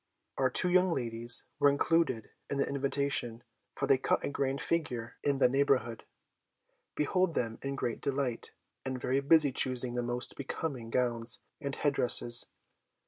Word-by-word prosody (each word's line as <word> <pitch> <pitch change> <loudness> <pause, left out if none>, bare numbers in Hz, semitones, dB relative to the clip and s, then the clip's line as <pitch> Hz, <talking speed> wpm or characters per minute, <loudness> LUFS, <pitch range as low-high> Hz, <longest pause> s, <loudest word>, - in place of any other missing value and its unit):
Our 130 -1 +2
two 180 +7 +4
young 185 0 +3
ladies 120 -4 +3 0.2
were 145 0 +5
included 140 -5 0 0.2
in 140 - -3
the 140 - 0
invitation, 140 -4 -2 0.3
for - - -2
they 135 - +3
cut - - 0
a - - -2
great 140 -1 -2
figure 125 -10 -3
in 140 -1 0
the 135 - +4
neighbourhood. 130 -4 0 0.9
Behold 175 +2 0
them 115 -2 -2
in 135 0 -4
great 120 -3 -4
delight, 135 -4 -3 0.3
and 130 -1 -5
very 130 +2 -1
busy 145 0 +4
choosing 125 -1 +1
the 120 - -2
most 120 +1 -4
becoming 135 -4 -5
gowns 120 -1 +1 0.2
and 140 -1 -4
head 145 -1 0
dresses. 120 -2 +5
135 Hz, 155 wpm, -30 LUFS, 120-140 Hz, 0.9 s, were